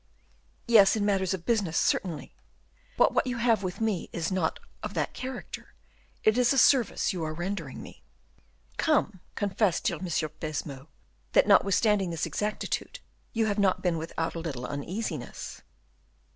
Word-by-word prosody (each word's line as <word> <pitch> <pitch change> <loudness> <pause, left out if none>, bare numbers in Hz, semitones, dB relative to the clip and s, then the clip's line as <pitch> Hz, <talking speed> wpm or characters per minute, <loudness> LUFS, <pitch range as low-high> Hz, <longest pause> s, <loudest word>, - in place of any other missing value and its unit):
"Yes, 215 -4 +7
in 210 -2 0
matters 190 -3 +1
of 170 - -11
business, 205 -8 +1
certainly; 165 -6 0 0.6
but - - +4
what - - +1
you 250 -1 -2
have 235 -3 +3
with 185 -2 -4
me 220 -5 -1
is 165 +2 -2
not 185 -4 0 0.2
of - - -6
that - - -1
character; 255 -1 -7 0.5
it 215 +3 +4
is 245 -1 +4
a 275 - +2
service 255 -6 +4
you 175 -3 -3
are 155 0 -3
rendering 175 -5 -4
me." - - -13 0.8
"Come, 290 - +1 0.2
confess, 200 -2 +1
dear 170 - -1
M. 185 - -6
de 165 -3 -1
Baisemeaux, 145 -3 -5 0.5
that, - - +6
notwithstanding 200 -1 +4
this 165 0 -2
exactitude, 215 - -3 0.3
you 225 -2 +1
have 210 -1 0
not 195 -2 +2
been 175 -3 +1
without 165 0 -3
a 170 - -4
little 140 -7 -4
uneasiness." 155 - -5
190 Hz, 160 wpm, -28 LUFS, 165-220 Hz, 0.8 s, Yes